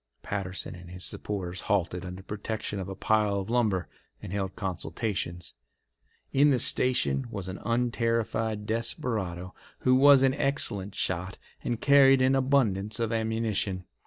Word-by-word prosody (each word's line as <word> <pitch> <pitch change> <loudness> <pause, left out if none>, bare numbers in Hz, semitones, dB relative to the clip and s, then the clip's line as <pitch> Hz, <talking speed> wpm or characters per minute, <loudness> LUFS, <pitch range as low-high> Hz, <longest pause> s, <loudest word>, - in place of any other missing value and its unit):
Patterson 95 -2 -4
and 90 -1 -11
his 90 +1 -6
supporters 95 -3 -4
halted 90 -3 -1
under 90 +1 -7
protection 105 0 -4
of 95 0 -5
a 95 - -5
pile 105 0 +1
of 100 +3 -5
lumber 105 -8 +1 0.3
and 90 - -8
held 95 -2 -3
consultations. 90 -1 -4 0.8
In 145 +2 +5
the 135 - +3
station 120 - +2
was 100 -5 -6
an 95 0 -6
unterrified 115 -2 0
desperado 105 -5 -2 0.3
who 130 - +3
was 135 +1 +7
an 135 -1 +4
excellent 105 -9 0
shot 90 +2 -2 0.3
and 120 -2 -2
carried 135 -1 +6
an 130 +1 +4
abundance 120 -7 +1
of 115 -1 -1
ammunition. 110 -4 -1
105 Hz, 140 wpm, -28 LUFS, 95-120 Hz, 0.8 s, was